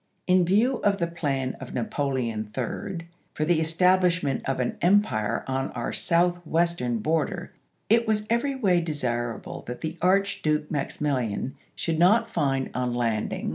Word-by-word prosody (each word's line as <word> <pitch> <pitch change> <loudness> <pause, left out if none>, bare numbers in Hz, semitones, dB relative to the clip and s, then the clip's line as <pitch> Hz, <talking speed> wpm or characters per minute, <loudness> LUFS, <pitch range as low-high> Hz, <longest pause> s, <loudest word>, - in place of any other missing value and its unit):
In 180 -1 +4
view 225 +8 +3
of 200 -2 +1
the 170 - 0
plan 140 -6 -2
of 130 - -8
Napoleon 120 -4 -2
III. 165 - -3 0.3
for 155 - 0
the 170 0 +3
establishment 180 -2 +2
of 135 - -1
an 125 - -2
empire 175 - +2
on 135 0 -1
our 120 -1 -3
Southwest 170 -1 +1
ern 120 -1 0
border, 165 - -1 0.3
it 230 +1 +3
was 210 -1 +1
every 240 +5 +1
way 190 -9 +2
desii 120 -7 -2
able - - -8
that 125 - -6
the 160 +1 -4
Archduke 185 -5 +1
Maximilian 135 -5 -1 0.2
should 165 -1 -1
not 215 +7 +5
find, 135 -10 0
on 125 -1 -1
landing 120 -1 +2
Halleck 110 -1 -2
to - - -3
Banks, - - -6
Aug. - - 0
160 Hz, 170 wpm, -26 LUFS, 130-185 Hz, 0.3 s, not